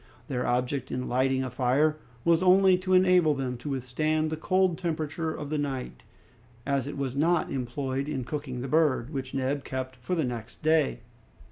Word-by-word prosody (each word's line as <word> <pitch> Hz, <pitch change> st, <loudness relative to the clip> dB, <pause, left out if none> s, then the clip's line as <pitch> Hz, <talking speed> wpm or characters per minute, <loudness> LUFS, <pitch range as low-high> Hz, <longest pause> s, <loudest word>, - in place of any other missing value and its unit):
Their 125 Hz, -2 st, -1 dB
object 125 Hz, +2 st, -1 dB
in 125 Hz, 0 st, -3 dB
lighting 130 Hz, +1 st, +1 dB
a 130 Hz, -, -4 dB
fire 140 Hz, +5 st, +2 dB, 0.3 s
was 170 Hz, 0 st, +4 dB
only 185 Hz, 0 st, +6 dB
to 185 Hz, 0 st, +1 dB
enable 180 Hz, -4 st, +5 dB
them 130 Hz, -2 st, -2 dB
to 135 Hz, +5 st, -6 dB
withstand 155 Hz, +4 st, -1 dB
the -, -, 0 dB
cold 185 Hz, +1 st, +1 dB
temperature 160 Hz, -1 st, -2 dB
of 145 Hz, -2 st, -6 dB
the 155 Hz, -, 0 dB
night, 135 Hz, -3 st, -4 dB, 0.6 s
as 140 Hz, -2 st, 0 dB
it 145 Hz, -, -5 dB
was 135 Hz, -2 st, -2 dB
not 165 Hz, +3 st, +2 dB
employed 135 Hz, +2 st, -3 dB
in 135 Hz, -4 st, -2 dB
cooking 130 Hz, -2 st, -5 dB
the 135 Hz, -, -4 dB
bird, 150 Hz, -4 st, +2 dB
which 130 Hz, -1 st, -4 dB
Neb 135 Hz, +1 st, -1 dB
kept 130 Hz, 0 st, -4 dB
for 130 Hz, +9 st, -3 dB
the 160 Hz, -4 st, +1 dB
next 120 Hz, +2 st, -6 dB
day. 155 Hz, -6 st, +2 dB
140 Hz, 180 wpm, -28 LUFS, 130-155 Hz, 0.6 s, only